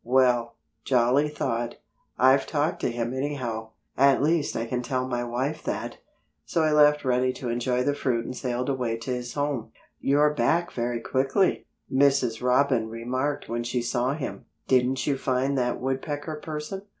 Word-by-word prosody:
"Well," 120 -2 +2 0.3
Jolly 130 +3 +3
thought, 120 -5 -2 0.4
"I've 130 +2 +4
talked 150 +1 0
to - - 0
him 120 +1 -2
anyhow. 130 -5 -3 0.3
At 135 +1 +4
least 160 0 +1
I 115 - -1
can 125 +1 -2
tell 130 0 -2
my 120 -1 -2
wife 130 +6 -2
that." - - -3 0.5
So 160 - 0
he 155 - +2
left 150 -1 +5
Reddy 130 0 +2
to 125 - -5
enjoy 125 +1 0
the 145 - +1
fruit 120 -5 -1
and 125 - -5
sailed 125 0 -2
away 125 -4 -1
to 115 +3 -5
his 125 -1 -4
home. 145 -6 -2 0.3
"You're 145 +2 +3
back 170 +3 +1
very 120 -1 -2
quickly," 135 - +1 0.3
Mrs. 135 -4 +3
Robin 125 -2 +2
remarked 130 +5 -2
when 120 +1 -2
she 120 +1 -1
saw 125 +3 0
him. 145 -4 -6 0.2
"Didn't 130 0 +2
you 140 -2 0
find 135 +1 0
that 125 -1 0
Woodpecker 145 +4 -3
person?" 155 +5 -5
130 Hz, 165 wpm, -26 LUFS, 120-145 Hz, 0.5 s, left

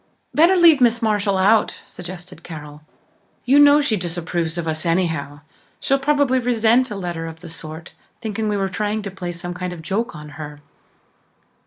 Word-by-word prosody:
"Better 335 +5 +5
leave 330 -5 +6
Miss 235 -1 +4
Marshall 205 -2 +1
out," 210 +4 +3
suggested 180 0 -9
Carol. 150 -3 -9 0.6
"You 275 +3 +5
know 290 0 +7
she 280 -7 +1
disapproves 175 -2 -3
of 170 -1 -3
us 155 0 -2
anyhow. 165 -5 -1 0.4
She'd 275 0 +1
probably 285 -2 +2
resent 240 +1 +2
a 210 - -5
letter 175 -4 -4
of 165 0 -10
the 175 - -9
sort, 160 0 -9 0.3
thinking 220 -1 -3
we 205 - 0
were 195 -1 0
trying 210 +2 -2
to 200 - -5
play 180 -2 -5
some 175 +1 -6
kind 180 0 -4
of 165 -2 -10
joke 200 +3 -2
on 150 0 -9
her." 150 -1 -8
190 Hz, 175 wpm, -21 LUFS, 165-230 Hz, 0.6 s, know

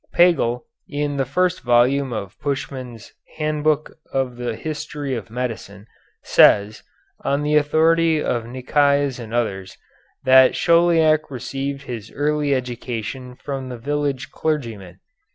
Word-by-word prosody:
Pagel, 165 -9 +3 0.3
in 145 0 -2
the 135 - +1
first 180 +6 0
volume 125 +3 +3
of 100 -3 -5
Puschmann's 130 -5 -5 0.2
"Handbook 155 -1 0 0.2
of 130 -2 -1
the 120 -2 -3
History 150 +1 -5
of 110 -6 -5
Medicine," 115 -4 -5 0.4
says, 105 +2 +4 0.4
on 140 +1 0
the 150 +1 +1
authority 160 +2 +3
of 120 -5 -2
Nicaise 140 +2 +1
and 115 -2 -8
others, 95 -6 -2 0.5
that 130 0 +6
Chauliac 165 -2 +3
received 135 +2 -4
his 115 -5 -7
early 145 -1 +1
education 125 0 -5
from 135 -1 -6
the 125 - -6
village 140 +1 -2
clergyman. 115 - -3
135 Hz, 120 wpm, -21 LUFS, 120-150 Hz, 0.5 s, that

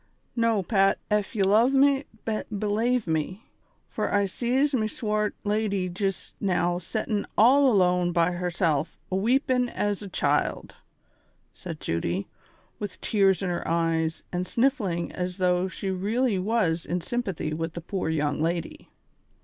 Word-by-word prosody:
" - - -43
Xo, 230 -5 +1
Pat, 195 -2 +3
ef 210 -2 +1
j'e 205 -4 +1
luv 225 +7 +4
ftie, 275 0 +4 0.5
belave 215 +4 0
me, 165 - -2 0.4
fur - - -3
I 200 -1 +3
sees 255 +8 0
me 220 -4 +1
swate 215 -1 -1
lady 205 -3 0
jist 195 +1 -3
now 175 -2 +1
settin' 210 +3 -2
all 265 +5 +6
alone 180 -3 +3
by 170 0 +2
herself 170 -3 -1
aweepin' 250 +5 +2
as 205 -3 -1
a 205 - -6
child," - - 0 0.8
said 165 -5 -7
Judy, 85 +4 -2 0.5
with 205 -1 -6
tears 195 -3 +2
in 185 - -1
her 175 - -3
eyes, 165 -1 0
and 180 +1 -2
sniffling 225 - 0
as 180 0 -4
though 180 0 +2
she 190 +1 -4
really 210 +3 0
was 185 -5 +1
in 180 - -2
sympathy 185 -6 -3
with 165 +1 -3
the 170 - -6
poor 180 0 -3
young 150 -2 0
lady. 170 +1 -3
195 Hz, 145 wpm, -26 LUFS, 175-220 Hz, 0.8 s, all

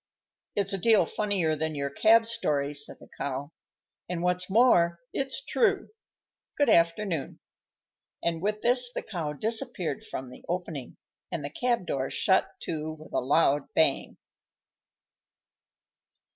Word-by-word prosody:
"It's 200 -1 0
a 195 - -2
deal 220 +2 +4
funnier 195 -7 0
than 155 0 -3
your 140 -1 -2
cab 225 +9 +5
story," 150 -11 -1
said 145 0 -2
the - - -15
Cow. 140 +2 -3 0.6
"And, 175 -1 -3
what's 180 +1 0
more, 190 -6 +4 0.2
it's 270 - -3
true! 405 -5 +1 0.7
Good 290 - +3
afternoon." 170 -1 +1 0.8
And 165 -1 -1
with 210 +2 -2
this 245 0 +5
the - - -4
Cow 165 -8 -4
disappeared 220 - -2
from 130 - -7
the - - -13
opening, 165 -7 -4 0.3
and 145 - -3
the 140 - -5
cab 240 0 0
door 135 -5 -2
shut 190 - +2
to 155 -1 -4
with 155 0 -14
a - - +2
loud 145 +1 +2
bang. - - +2
175 Hz, 135 wpm, -28 LUFS, 150-220 Hz, 0.8 s, cab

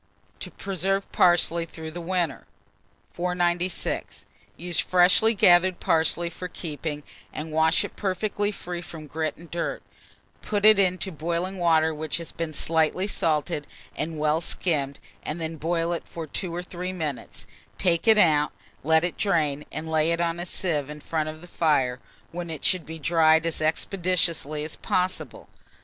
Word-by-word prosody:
TO - - -6
PRESERVE 195 +1 -2
PARSLEY 170 -1 +3
THROUGH 160 -1 -8
THE 175 +2 -6
WINTER. 170 -4 -2 0.7
496. 175 0 -1 0.3
Use 175 -1 -1
freshly 185 +5 +4
gathered 180 -1 +5
parsley 165 +1 +1
for 180 - -6
keeping, 150 -3 -5 0.3
and 155 +1 -6
wash 160 +2 +3
it - - -9
perfectly 205 +1 -1
free 175 -3 -6
from 160 -2 -9
grit 155 +2 -3
and 170 0 -14
dirt; 170 0 -3 0.6
put 205 -1 -1
it 215 -1 +8
into 185 0 +1
boiling 170 +4 -3
water 160 -2 +3
which 155 +1 -2
has 170 -1 -6
been 165 -1 -4
slightly 160 +4 +2
salted 155 -5 0 0.3
and 160 +1 -3
well 155 +1 +1
skimmed, 145 -5 -1 0.2
and 155 - -5
then 160 -1 -2
let 165 +1 +1
it 165 - 0
boil 170 -1 -1
for 165 -1 -7
2 170 +3 -3
or 175 - -3
3 180 +1 -5
minutes; 155 -8 -5 0.3
take 175 +2 +1
it 220 -1 +7
out, 150 -6 +4 0.3
let 160 +2 +4
it 175 - -2
drain, 150 -7 +1
and 160 - -5
lay 160 0 +3
it 170 - 0
on 170 0 0
a 175 - -4
sieve 150 -7 -2
in 150 0 -7
front 155 0 -2
of 155 0 -9
the 175 - -11
fire, 135 -8 +1 0.3
when 175 0 -5
it 160 -3 -5
should 180 -4 +2
be 160 +1 -6
dried 160 0 +4
as 165 -1 -2
expeditiously 165 -2 0
as 155 - -6
possible. 180 -7 -2
165 Hz, 165 wpm, -25 LUFS, 155-180 Hz, 0.7 s, it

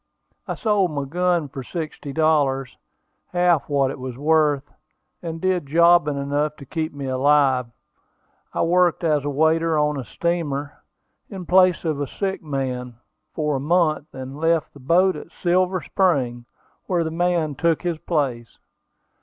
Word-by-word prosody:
I - - -3
sold 205 -5 +1
my 145 -3 -3
gun 175 +1 0
for 135 0 -7
sixty 155 0 -6
dollars, 140 -4 +1 0.6
half 175 -4 +2
what 140 -2 +2
it - - -8
was 130 -1 -6
worth, 150 -1 +1 0.5
and 165 -1 -5
did 185 -4 0
jobbing 170 -1 +4
enough 145 +2 -1
to 140 - -12
keep 160 +3 -3
me 140 -1 -7
alive. 130 -1 +2 0.8
I - - 0
worked 175 0 +2
as 150 -4 +2
a 145 - -2
waiter 160 +2 +2
on 150 -1 +1
a - - -4
steamer, 145 - -2 0.6
in 190 -4 -7
place 185 0 +4
of 155 -3 -1
a 145 - -2
sick 195 +5 -3
man, 130 -5 -4 0.4
for 150 -3 0
a - - -3
month, 155 0 +1
and 130 +2 -8
left 165 -1 +1
the 145 - -14
boat 175 +8 +3
at - - -9
Silver 185 +1 +1
Spring, 130 -11 0 0.4
where 175 -3 +1
the 160 - -3
man 170 -2 0
took 165 +4 0
his 170 -3 -2
place. 130 -9 -2
155 Hz, 155 wpm, -22 LUFS, 140-175 Hz, 0.8 s, jobbing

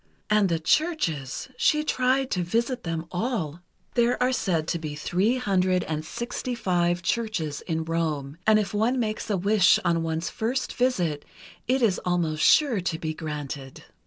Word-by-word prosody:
And 210 -2 +4
the 165 - +1
churches—she 255 - 0
tried 260 -2 +1
to 180 - 0
visit 235 +8 -1
them 165 -1 -3
all! 180 - -2 0.3
There 240 0 +2
are 250 +1 +2
said 165 -9 0
to 170 - -1
be 155 -2 -5
three 190 - +1
hundred 185 -5 +1
and 155 -1 -3
sixty 245 +7 -4
five 175 -4 0
churches 180 -11 -1
in 160 -2 -1
Rome, 160 -3 -2
and 215 0 +6
if 205 -2 -1
one 230 +5 +1
makes 220 -1 -2
a 205 - +1
wish 200 0 +4
on 170 -1 +2
one's 165 0 -2
first 250 +4 -2
visit 180 - 0 0.4
it 255 +1 +2
is 200 -5 +3
almost 170 -4 0
sure 260 - +4
to 170 -2 -2
be 155 -1 -3
granted. 150 -4 -6
180 Hz, 160 wpm, -26 LUFS, 160-235 Hz, 0.4 s, and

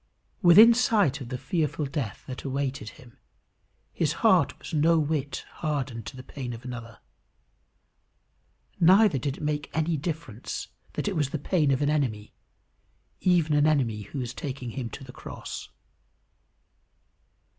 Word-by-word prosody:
Within 210 +7 +9
sight 205 - +2
of 120 - -7
the 125 - -3
fearful 150 +2 -1
death 135 -7 -4
that 130 - -7
awaited 135 -4 -3
him, 125 0 -17 0.7
his - - 0
heart - - +4
was - - -10
no 165 +2 +4
whit 150 -2 -1 0.2
hardened 135 -8 -2
to - - -8
the 130 - -8
pain 130 -2 -6
of 115 +2 -10
another. 120 -2 -7 1.8
Neither 185 -2 +6
did 140 +2 -3
it - - -8
make 150 -1 -2
any 160 0 +1
difference 145 - -5 0.2
that - - -3
it 200 - -1
was 145 -4 +1
the 155 - -2
pain 150 0 +1
of 135 +1 +2
an 145 - +2
enemy 115 -9 -1 0.9
even 170 -4 +3
an 145 +1 +4
enemy 125 -9 +1
who 105 +8 -8
was 125 -2 -3
taking 130 -3 -5
him 120 -1 -4
to 135 - -9
the 125 -1 -11
cross. - - -8
140 Hz, 150 wpm, -27 LUFS, 125-155 Hz, 1.8 s, Within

